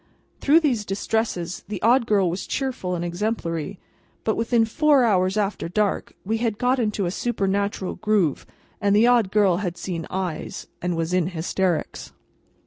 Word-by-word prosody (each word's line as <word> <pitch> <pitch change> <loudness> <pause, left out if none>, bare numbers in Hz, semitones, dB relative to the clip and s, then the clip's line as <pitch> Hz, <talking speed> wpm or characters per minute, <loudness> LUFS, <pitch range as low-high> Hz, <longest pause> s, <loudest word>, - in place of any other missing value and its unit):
Through 310 +4 +5
these 250 -9 +1
distresses, 195 -3 -2
the 205 -2 -4
Odd 235 +1 +4
Girl 200 -4 +3
was 175 +3 -3
cheerful 250 -10 -2
and 175 0 -3
exemplary. 175 -2 -3 0.5
But 220 - +1
within 230 0 +2
four 285 +3 +3
hours 190 -3 +2
after 200 -4 -1
dark 210 +2 -1
we 220 +3 0
had 225 -3 -1
got 255 +2 +2
into 210 -4 0
a 175 - -1
supernatural 200 -3 -1
groove, 210 -9 +1 0.3
and 200 -1 +3
the 215 +3 +5
Odd 240 -5 +4
Girl 200 -5 +3
had 180 -3 -3
seen 175 -2 -4
"Eyes," 185 -4 -4 0.2
and 180 0 -1
was 165 +1 -1
in 180 -2 +2
hysterics. 175 0 -2
200 Hz, 160 wpm, -23 LUFS, 180-225 Hz, 0.5 s, Through